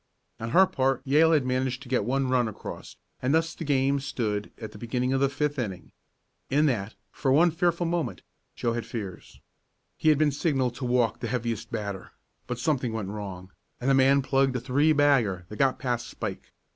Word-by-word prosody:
On 115 - -4
her 190 +10 +6
part 135 -6 0
Yale 155 +4 +5
had 145 -5 +3
managed 130 0 -1
to - - -13
get 125 -3 +1
one 135 +2 0
run 125 -2 +2
across, 110 - -8 0.3
and 130 +4 +2
thus 165 +1 +1
the - - -7
game 140 -1 +2
stood 110 -6 -3
at 110 -2 -7
the 105 - -12
beginning 125 +3 -1
of 135 - +2
the 140 - +3
fifth 145 +1 -1
inning. 95 -8 -5 0.6
In 150 +3 +3
that, 110 -7 -1 0.2
for 135 - -1
one 165 +5 +5
fearful 170 +1 +1
moment, 170 -1 -2 0.3
Joe 115 - -1
had 120 0 -4
fears. 100 -6 -7 0.6
He 155 - +3
had 155 - +5
been 150 0 +3
signalled 135 -4 0
to 130 - -4
walk 120 -2 +1
the 120 - -3
heaviest 115 -2 -3
batter, 100 -4 -5 0.3
but 125 - -3
something 125 -3 0
went 110 -4 -3
wrong, 95 -3 -7 0.3
and 130 +3 +1
the - - +5
man 135 +1 +4
plugged 135 0 +2
a - - 0
three 140 +6 +2
bagger 135 - +3
that 105 - -8
got 135 -2 +3
past 120 -2 -2
Spike. - - -6
130 Hz, 200 wpm, -27 LUFS, 115-140 Hz, 0.6 s, her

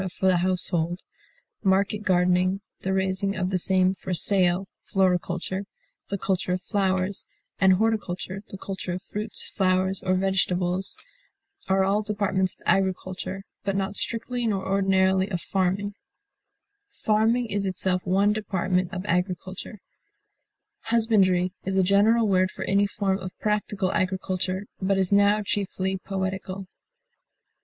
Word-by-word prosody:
for - - -1
the 185 -1 +5
household, 175 -1 0 0.6
market 200 +2 +2
gardening, 185 -1 +2 0.2
the 190 - -2
raising 190 +1 0
of 185 0 -1
the 185 - +2
same 185 +1 +3
for 185 -1 -4
sale, 185 0 +2
floriculture, 185 0 0 0.4
the 200 - -1
culture 185 -1 -1
of 185 - -2
flowers, 190 -1 +1 0.3
and 190 -1 +6
horticulture, 195 -2 -1
the 195 - -8
culture 190 -2 -5
of 180 +2 -5
fruits, 210 +2 -5
flowers, 190 0 0
or 185 0 +1
vegetables, 185 -1 0 0.7
are 190 0 +3
all 200 +2 +2
departments 200 -3 0
of - - -36
agriculture, 190 0 -1 0.2
but 195 -1 -1
not 195 +1 -1
strictly 235 +2 0
nor 200 -3 -1
ordinarily 190 0 +2
of 180 -4 -2
farming; 195 +3 -1 1.0
farming 225 - +1
is 200 -3 -2
itself 185 -1 0
one 195 +3 +3
department 185 -3 -1
of 185 -1 -5
agriculture. 185 +2 -3 1.0
Husbandry 195 -6 +3
is 190 0 -1
a 190 - +5
general 210 +4 +4
word 185 -1 +3
for - - -6
any 200 +1 +2
form 195 -1 -1
of 185 -1 -8
practical 205 -3 0
agriculture, 185 +1 -1 0.2
but 195 +1 +1
is 190 -1 +1
now 205 +1 +4
chiefly 190 -1 -2
poetical. 190 0 -3
190 Hz, 130 wpm, -25 LUFS, 185-200 Hz, 1.0 s, and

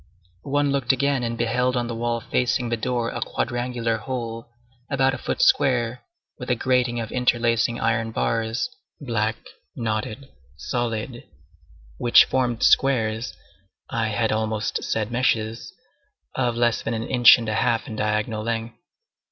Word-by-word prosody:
One 145 0 +2
looked 135 -2 +2
again, 140 0 +1
and 115 -1 -3
beheld 125 +2 +1
on 120 - 0
the 120 - -4
wall 115 0 -2
facing 125 0 0
the 115 - +1
door 120 +1 -2
a - - -5
quadrangular 120 -2 -2
hole, 115 0 -5 0.4
about 135 -1 +2
a - - -5
foot - - -1
square, 125 -2 +2 0.4
with 125 - -7
a 125 - +3
grating 125 -1 +1
of 110 -1 -5
interlacing 120 -2 +1
iron 115 0 0
bars, 115 - -1 0.3
black, 115 -5 -1 0.4
knotted, 110 +3 -3 0.3
solid, 120 0 -3 0.7
which 120 - +6
formed 125 -3 -1
squares—I 115 -2 0
had 110 +1 0
almost 110 0 -1
said 110 0 -2
meshes—of 125 - -3
less 120 -1 +1
than 115 - -2
an 110 - -3
inch 120 -2 +7
and 115 -2 -5
a 110 - -1
half 115 0 +1
in 115 -6 -7
diagonal 110 +1 -1
length. 115 +1 -4
120 Hz, 140 wpm, -23 LUFS, 115-125 Hz, 0.7 s, inch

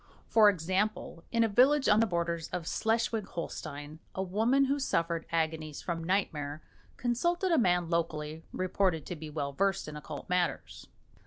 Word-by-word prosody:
For 215 -2 +6
example, 185 0 -1
in 230 0 +3
a - - +3
village 265 +7 +4
on 210 0 +5
the 225 - +3
borders 170 -3 -1
of 170 -2 -5
Schleswig 225 -1 0
Holstein, 150 -2 -6 0.2
a 190 - -1
woman 225 +9 +2
who 280 +2 0
suffered 165 -10 -1
agonies 160 -2 -2
from 165 -2 -3
nightmare 155 -5 -1 0.3
consulted 345 +10 0
a 330 - +5
man 180 -5 +2
locally 160 -2 -2
reported 185 -3 0
to 180 - -5
be 155 -1 -8
well 145 -2 -3
versed 195 +3 0
in 150 - -7
occult 150 0 -7
matters. 180 -1 -1
180 Hz, 160 wpm, -30 LUFS, 160-220 Hz, 0.3 s, For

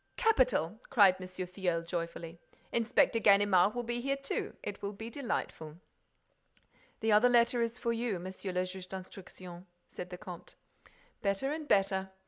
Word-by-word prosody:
"Capital!" 255 - +2
cried 200 -8 +6
M. 185 - -6
Filleul, 180 -2 -2
joyfully. 170 0 -5 0.3
"Inspector 230 0 +3
Ganimard 200 -1 +5
will 245 - -2
be 240 +1 -3
here 275 +2 0
too. 275 0 -4
It 205 - -5
will 200 +1 -3
be 225 +3 -8
delightful." 165 - -4 1.2
"The 220 0 +2
other 215 +4 +6
letter 240 0 +4
is 230 +1 -1
for 235 - -1
you, 230 -4 -1
Monsieur 185 +2 -6
le 180 0 0
Juge 185 0 -8
d'Instruction," 185 -1 -9 0.2
said 180 - -8
the 180 - -7
comte. 180 -3 -10 0.7
"Better 200 +6 0
and 305 0 -4
better," 195 -7 +5
said 190 -1 -2
M. - - -20
200 Hz, 160 wpm, -32 LUFS, 180-235 Hz, 1.2 s, cried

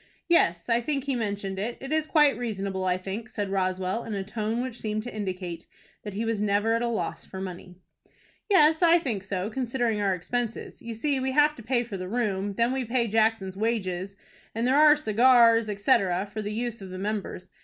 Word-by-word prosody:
"Yes, 170 - +3
I 235 0 +2
think 275 +1 -2
he 275 -1 -1
mentioned 200 -4 -3
it. 230 +4 -3
It 270 +3 -5
is 310 0 +1
quite 295 -3 +4
reasonable, 195 -5 -3
I 180 0 +1
think," 195 +5 -6
said 205 -2 -4
Roswell, 185 +3 -1
in 220 - -5
a 195 - -2
tone 220 +3 -2
which 255 -2 -6
seemed 215 0 -2
to 245 - -7
indicate 185 -5 -5 0.3
that 205 -2 -7
he 220 +3 -2
was 225 -2 -1
never 210 +2 +2
at 230 - +1
a 240 - 0
loss 235 -2 -3
for 190 - -9
money. 180 -1 -7 0.7
"Yes, 320 -4 +5
I 340 0 +6
think 245 - -2
so, 190 +1 -3
considering 240 -3 -1
our 195 -2 +2
expenses. 235 +6 -4
You 230 -1 -6
see 275 +4 0
we 260 0 -1
have 295 +1 +4
to 245 - -12
pay 240 +2 0
for 225 -5 -6
the 185 0 -6
room; 205 -3 -1
then 235 +3 +2
we 265 -1 -1
pay 235 0 0
Jackson's 220 -3 +1
wages, 195 -3 -2 0.4
and 230 +1 0
there 260 +2 +3
are 300 0 +7
cigars, 230 -3 +4
etc., 200 -3 +2
for 215 +1 -6
the 210 0 -4
use 230 0 -3
of 190 - -8
the 185 - -7
members. 200 -2 -4
220 Hz, 210 wpm, -27 LUFS, 195-245 Hz, 0.7 s, are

